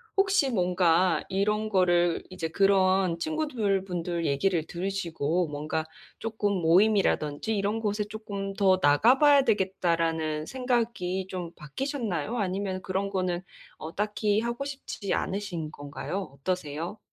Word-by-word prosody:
혹시 385 -8 +3
뭔가 180 -3 +2
이런 210 +3 0
거를 175 -3 +2
이제 175 -3 -4
그런 190 -2 +3
친구들 230 - -1
분들 175 -2 -3
얘기를 160 +4 +1
들으시고 175 -3 -1
뭔가 150 +2 -3 0.3
'쪼끔 220 -2 -1
모임이라든지 190 0 +2
이런 205 +3 0
곳에 210 -1 -1
쪼끔 205 -2 -5
더 195 -2 +4
나가봐야 260 - +6
되겠다.'라는 165 - 0
생각이 230 -7 -1
좀 180 -3 -5
바뀌셨나요? 225 - -3
아니면 190 -1 -2
그런 190 +2 -1
거는 185 -2 -1 0.4
어, 160 +1 -8
딱히 210 0 +1
하고 235 +4 -3
싶지 270 -7 -4
않으신 180 -6 -3
건가요? 150 +7 -5
어떠세요? 170 +3 -3
190 Hz, 290 characters per minute, -27 LUFS, 170-215 Hz, 0.4 s, 나가봐야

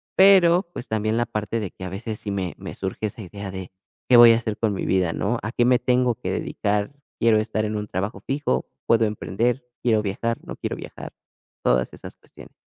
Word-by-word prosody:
pero, 190 -1 +6
pues, 120 - -7
también 110 0 0
la 120 - +2
parte 105 +2 -2
de 100 -4 -4
que 95 - -11
a 90 - -4
veces 105 +3 -5
sí 100 - -4
me 95 -3 -3
me - - -7
surge 95 +3 -3
esa 105 +2 -9
idea 100 +1 -7
de: 95 -1 -7 0.4
"¿Qué 125 - +8
voy 120 -1 +10
a - - +3
hacer 110 -2 -3
con 110 -3 0
mi 95 - -3
vida, 90 -3 +2
no? 115 +4 -1
¿A 105 - -3
qué 120 0 +2
me 125 0 +5
tengo 125 -2 +2
que - - -4
dedicar? 105 +5 -1 0.3
¿Quiero 115 -1 +4
estar 110 0 -1
en 105 - -2
un 105 0 -3
trabajo 95 +5 -3
fijo? 145 +2 -1 0.2
¿Puedo 115 -1 +4
emprender? 115 +4 -1 0.2
¿Quiero 110 -3 +3
viajar, 110 +3 -2
no - - -6
quiero - - -3
viajar?" - - -9 0.5
Todas 60 +1 +2
esas - - -10
cuestiones. - - -16
110 Hz, 220 wpm, -23 LUFS, 100-120 Hz, 0.5 s, voy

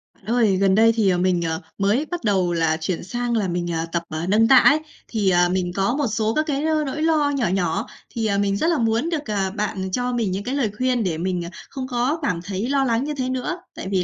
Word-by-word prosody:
Bạn - - -26
ơi, 220 -3 +2
gần 195 0 +3
đây 225 +2 +6
thì, 215 -4 +3
ờ, 180 - +2
mình, 180 -1 +1
ờ, 160 0 -2 0.2
mới 205 +9 +1
bắt 350 -4 -4
đầu 190 -5 +1
là 165 -1 +1
chuyển 170 +2 -2
sang 240 +5 -2
là 205 -3 0
mình, 175 -1 -2
à, 165 0 -1
tập, 170 0 -1
à, 155 +1 -3
nâng 220 +3 +4
tạ 265 - +7
ấy. 290 +4 +6 0.3
Thì, 210 -4 0
à, 175 -1 +4
mình 180 -1 -1
có 195 +6 +1
một 285 -2 0
số 220 0 0
các 310 +4 +1
cái, 280 0 -1
a, 315 0 +1
nỗi 295 +3 -4
lo 315 -3 +2
nhỏ 255 -5 +1
nhỏ 175 -3 -1 0.2
thì, 230 -2 -3
à, 200 -2 +1
mình 200 0 +1
rất 320 - 0
là 335 -2 +2
muốn 230 +6 +1
được, 300 -9 -3
à, 195 -2 0
bạn, 210 +2 -3
ừm, 190 0 -4
cho 250 +4 -1
mình 230 -5 0
những 195 +2 -3
cái 255 +5 -3
lời 245 -7 0
khuyên 255 -1 +1
để 175 -5 -1
mình, 175 0 -2
à, - - -6 0.2
không 265 -2 -5
có 255 +5 0
cảm 180 - -1
thấy 200 +4 -3
lo 275 -1 +2
lắng 235 0 +1
như 300 +1 -3
thế 260 -3 -2
nữa. 260 +7 -2 0.2
Tại - - -6
vì 185 -2 +2
215 Hz, 280 wpm, -22 LUFS, 185-255 Hz, 0.3 s, tạ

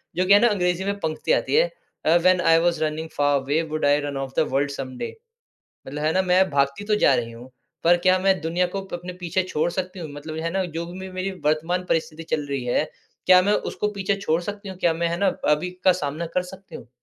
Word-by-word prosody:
जो 185 - +1
कि 200 - +6
है 205 - +8
ना 240 - +5
अंग्रेजी 180 -4 0
में 200 0 -2
पंक्ति 160 - -2
आती - - +1
है - - +5 0.4
अ, 165 +2 +5
when 185 +1 +3
I 165 -2 +5
was 170 -2 +1
running 155 +1 -3
far 145 -1 +3
away, 145 +4 0
would 155 -1 -2
I 145 +1 +4
run 140 -1 -4
of 135 -1 -5
the 155 - +3
world 140 +1 +1
someday, 130 - -6 0.7
मतलब 145 +2 -5
है 155 - +2
ना 190 - +3
मैं 185 +1 +3
भागती 140 +6 +1
तो 210 0 +2
जा 135 - +5
रही 115 -1 -2
हूँ, 120 +3 -12 0.3
पर 175 +1 +5
क्या 185 0 +5
मैं 190 -1 +2
दुनिया 170 +3 0
को 195 - -1
प - - -9
अपने 175 +1 -5
पीछे 175 +2 0
छोड़ 170 -2 -1
सकती 185 0 -4
हूँ? 160 -3 -6
मतलब 155 +2 -7
है 165 - 0
ना 190 0 0
जो 165 0 -5
भी 175 +2 -9
मे 190 0 -7
मेरी 185 +1 -2
वर्तमान 165 +4 +1
परिस्थिति 160 0 -1
चल 150 -2 -4
रही 140 -3 -2
है। 125 +5 +1 0.4
क्या 185 0 +7
मैं 205 +3 +2 0.2
उसको 210 - -2
पीछे 200 0 -1
छोड़ 165 -2 +1
सकती 200 +2 -6
हूँ? 185 - -8
क्या 170 -3 +2
मैं 170 +1 -1
है 170 - -2
ना 200 - +3 0.2
अभी 155 +5 +1 0.2
का 185 - +8
सामना 150 +4 -3
कर 180 - +3
सकती 190 +1 -12
हूँ? - - -10
170 Hz, 255 wpm, -23 LUFS, 150-185 Hz, 0.7 s, है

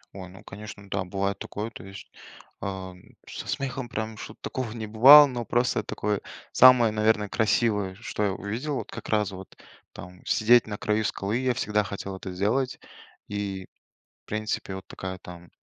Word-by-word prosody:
Ой, 95 -2 -8
ну, 95 - -14
конечно, 100 0 -10
да, 95 -1 0
бывает 100 +1 -2
такое, 110 +3 -5
то 110 - -11
есть, 100 +1 -11 0.5
ам, 95 -2 -6 0.3
со - - -7
смехом 135 -2 -3
прям 110 -1 -4
что-то 105 - -9
такого 130 -4 -3
не 110 -2 -5
бывало. 130 +8 +9
Но 125 -4 -4
просто 120 0 +1
такое, 105 -1 -2 0.3
самое, 125 -3 +7
наверное, 105 -1 +1
красивое, 105 -3 +1
что 105 0 -4
я 100 - +2
увидел, 115 +10 -4
вот - - -5
как - - -8
раз 105 -3 +1
вот- 95 0 -11 0.3
там 90 0 -12
сидеть 115 +1 +4
на 105 - -5
краю 105 +1 0
скалы- 105 +2 -1
я 130 -1 +1
всегда 105 0 0
хотел 100 -1 -6
это 95 0 -7
сделать, 115 +8 0 0.5
и, 100 -2 -4 0.6
в - - -67
принципе, 110 -2 -3
вот 95 - -9
такая 95 -1 -6
там 85 -1 -12
105 Hz, 175 wpm, -26 LUFS, 95-115 Hz, 0.6 s, бывало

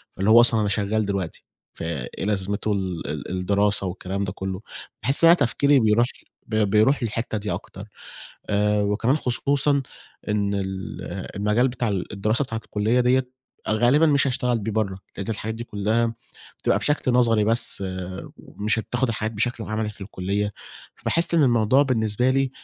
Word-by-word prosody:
فاللي 100 +3 0
هو 115 +2 +8
أصلًا 115 -2 +5
أنا 105 - 0
شغّال 105 +1 0
دلوقتي 100 -4 -4 0.3
فإيه 80 +1 -5
لازمته 100 +1 -1
ال 95 -6 -3
ال 75 +2 -5
الدراسة 100 +2 +1
والكلام 95 +2 -4
ده 90 - -3
كلّه. 95 0 -5 0.4
باحس 135 +7 +4
إن 165 - +9
أنا 170 - +8
تفكيري 140 0 +3
بيروح 110 +1 +3 0.4
ب 110 - -3
بيروح 110 +5 +3
للحتة 115 0 -2
دي 105 0 -4
أكتر. - - -7 0.6
آآ 105 0 +2
وكمان 110 +7 +1
خصوصًا 140 +1 +1 0.5
إن 100 -1 0
ال 100 -1 -1 0.7
المجال 105 +6 +2
بتاع 120 -2 -2
ال 100 0 -3
الدراسة 110 +7 0
بتاعة 115 -3 -5
الكلّية 110 +4 +1
دِيّة 125 +1 +2 0.4
غالبًا 120 +9 +4
مش 140 -2 +3
هاشتغل 125 -2 0
بيه 110 +1 -4
برّه، 100 -3 -1 0.2
لأن 100 - -5
الحاجات 110 0 -3
دي 115 +1 -6
كلّها 115 +2 0 0.4
بتبقى - - +1
بشكل 145 -4 0
نظري 115 -4 +3
بس، 110 -3 +2 0.5
ومش 105 +2 -2
هتاخد 120 +4 -1
الحاجات 110 0 -2
بشكل 115 +2 -2
عملي 110 0 -2
في 105 - -15
الكلّية، 100 +1 -3 0.4
فباحس 170 0 +1
إن 160 - +5
الموضوع 120 +1 +4
بالنسبة 120 -1 +1
لي 135 0 +1
110 Hz, 160 wpm, -23 LUFS, 100-125 Hz, 0.7 s, إن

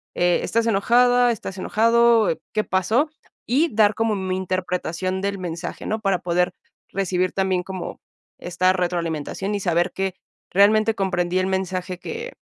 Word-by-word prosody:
eh, 175 0 +2
¿estás 230 0 0
enojada? 245 +3 +4
¿estás 195 -4 -6
enojado? 230 -1 +3 0.2
¿Qué 215 - +1
pasó? 220 - +1 0.4
Y 280 +5 +2
dar 210 -1 +4
como 225 -1 0
mi 190 -1 -2
interpretación 185 0 -2
del 200 0 -2
mensaje, 170 -2 -5
¿no? 220 +1 -2
Para 195 -3 +1
poder 180 0 0 0.4
recibir 185 -1 -1
también 190 -2 0
como 190 -1 -6 0.4
esta 180 +1 +1
retroalimentación 175 +1 -2
y - - -1
saber 175 -1 +1
que 190 -1 -2 0.4
realmente 215 +3 +4
comprendí 180 -2 0
el 185 - 0
mensaje 185 -1 -2
que 465 +2 -6
190 Hz, 145 wpm, -22 LUFS, 180-220 Hz, 0.4 s, enojada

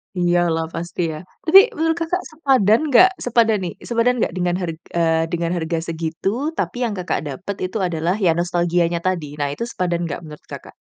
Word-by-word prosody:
Iya 175 -1 +2
lah, 160 0 -1
pasti 170 +1 -4
ya. 155 - -6 0.3
Tapi, 355 +4 +9 0.2
menurut 325 +1 0
Kakak 360 +3 -1
sepadan 260 - +3
nggak 365 +8 +7 0.2
sepadan 230 -3 +3
nih 175 - -4 0.2
sepadan 235 +1 +2
nggak - - 0
dengan 175 -1 0
harg 165 -3 -3 0.2
eee, 165 -1 +2
dengan 170 0 -1
harga 165 0 -2
segitu, 165 +3 -2 0.3
tapi - - -2
yang 225 - -2
Kakak 180 -1 -1
dapat 175 +9 -5
itu, 185 +4 -4
adalah, 170 +2 -1
ya 170 - +5
nostalgianya 175 -1 +1
tadi. 170 -6 -2
Nah, 145 - 0
itu 190 - -5
sepadan 175 -6 -2
nggak, 145 - -4
menurut 150 -1 -12
Kakak? - - -10
175 Hz, 190 wpm, -20 LUFS, 165-225 Hz, 0.3 s, Tapi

